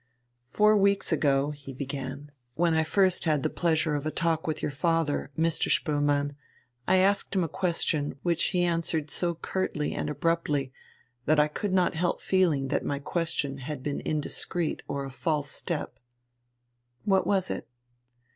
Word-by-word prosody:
"Four 210 0 +4
weeks 200 -1 +2
ago," 145 -2 +2
he 140 -2 -9
began, 140 +1 -5 0.2
"when 170 +1 +2
I 160 0 +3
first 185 +2 +3
had 150 -4 +2
the - - 0
pleasure 160 -2 +1
of 145 -1 -1
a 155 - -1
talk 165 0 0
with 155 -1 -1
your - - 0
father, 165 +1 0
Mr. 165 0 +1
Spoelmann, 145 -1 +1 0.5
I 185 - +4
asked 195 +1 +2
him 185 - +3
a - - -1
question 160 -4 -1
which 170 -2 +1
he 180 -1 +1
answered 165 -3 -1
so 170 +2 -1
curtly 160 -3 -2
and - - -2
abruptly 150 -3 0 0.5
that 155 +1 +4
I 150 - +5
could 195 +6 -3
not 185 -1 +3
help 175 +1 0
feeling 165 -8 +2
that 145 - 0
my 140 - -1
question 145 -2 -2
had 135 0 -6
been 145 0 -2
indiscreet 155 +2 -2
or 140 -1 -3
a 135 - -7
false 150 +1 -1
step." 150 -8 -3 1.1
"What 195 -2 +3
was 190 -2 +1
it?" - - -5
155 Hz, 165 wpm, -28 LUFS, 145-175 Hz, 1.1 s, I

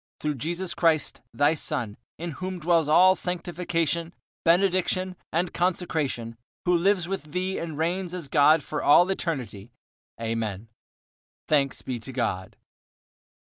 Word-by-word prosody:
Through 150 0 -1
Jesus 175 +7 -2
Christ, 160 -3 +1
Thy 145 +2 +3
Son, 115 -8 -2 0.2
in 170 +1 -5
whom 185 +5 -5
dwells 165 -2 +2
all 180 +5 +6
sanctification, 170 -2 -2 0.3
benediction, 185 +1 +2 0.2
and 175 +2 0
consecration; 155 -10 -1 0.3
who 180 - +3
lives 180 +1 +2
with 165 -6 -5
Thee 185 +1 -1
and 160 -3 -5
reigns 175 +3 -1
as 170 -5 -4
God 150 +2 +5
for 150 - -4
all 175 +5 +6
eternity, 125 - -4 0.5
Amen. 115 -2 -3 0.8
Thanks 140 -3 +1
be 125 -2 -4
to 130 - -8
God. 115 -7 -3
165 Hz, 130 wpm, -26 LUFS, 140-180 Hz, 0.8 s, all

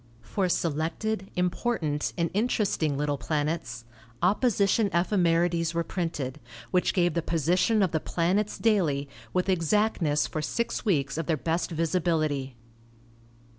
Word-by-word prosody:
For 185 - -1
selected, 175 +6 -1
important 180 -4 -1
and 170 -1 0
interesting 200 - 0
little 145 -1 -1
planets 145 -4 -2 0.4
opposition 205 +1 +3
ephemerides 170 -2 +1
were 170 - +1
printed, 150 -7 -3 0.3
which 180 +3 +2
gave 175 -3 +3
the 170 - 0
position 175 - +2
of 185 - +1
the 160 - +1
planets 185 +7 0
daily 165 -11 +1 0.2
with 180 +7 0
exactness 175 -4 +2
for 155 - -3
six 235 +9 -2
weeks 150 - 0
of 165 - -3
their 160 - +1
best 165 +4 -1
visibility. 155 -5 0
170 Hz, 125 wpm, -27 LUFS, 155-190 Hz, 0.4 s, opposition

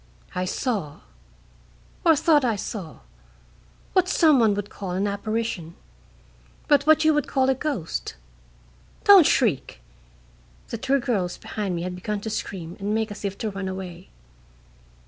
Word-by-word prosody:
I 180 - -1
saw 190 - -3 1.0
or 325 -2 +6
thought 300 -1 +3
I 235 -3 +1
saw 195 -4 -6 0.9
what 370 -1 +3
some 310 -5 +5
would 205 -3 +1
call 195 -2 -6
an 190 +3 0
apparition, 205 -4 -3 0.9
but 285 0 +3
what 315 0 +5
you 315 - +5
would 295 -2 0
call 265 0 +2
a - - +3
ghost. 255 - -4 0.9
Don't 390 -6 +8
shriek!" 180 - +1 0.9
(The 230 - -4
two 270 +3 +1
girls 205 -9 -1
behind 200 -4 -4
me 170 - -3
had 180 0 -4
begun 205 +3 -3
to 220 - -4
scream 180 -5 -5
and 205 +2 -1
make 220 -1 -1
as 205 - -8
if 200 -1 -3
to 220 - -3
run 195 -1 -5
away.) 185 -1 -7
210 Hz, 145 wpm, -24 LUFS, 185-265 Hz, 1.0 s, Don't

